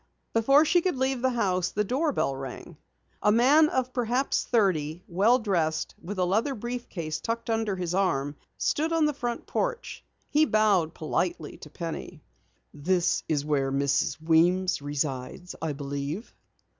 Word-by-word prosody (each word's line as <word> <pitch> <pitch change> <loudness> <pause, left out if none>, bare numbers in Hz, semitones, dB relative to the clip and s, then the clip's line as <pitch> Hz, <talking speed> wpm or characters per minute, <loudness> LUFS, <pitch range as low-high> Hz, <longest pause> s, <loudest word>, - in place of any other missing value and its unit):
Before 275 +7 +5
she 350 +3 +3
could 360 -5 -1
leave 260 -1 0
the 260 - +3
house, 185 -7 0
the 210 - -1
doorbell 260 - 0
rang. 135 -1 -8 0.5
A 210 - +4
man 280 +8 +5
of 255 0 -1
perhaps 250 +2 0
thirty, 180 -7 +1
well 205 +7 +4
dressed, 170 -9 -1
with 200 +3 -6
a 180 - +2
leather 220 +10 +1
briefcase 205 -9 -5
tucked 230 0 -3
under 225 -3 0
his 180 -2 -3
arm, 150 -7 0 0.2
stood 315 +2 0
on 325 -2 +3
the 300 - +1
front 240 -3 -4
porch. - - -3 0.3
He 305 +1 +4
bowed 205 - +2
politely 160 0 -2
to 150 - -12
Penny. 165 0 -6 0.5
"This 170 +4 +1
is 145 -2 0
where 140 -3 0
Mrs. 140 +2 0
Weems 175 +2 +2
resides, 145 +3 -4
I 160 -2 -1
believe?" 140 - -5
190 Hz, 150 wpm, -27 LUFS, 155-245 Hz, 0.5 s, Before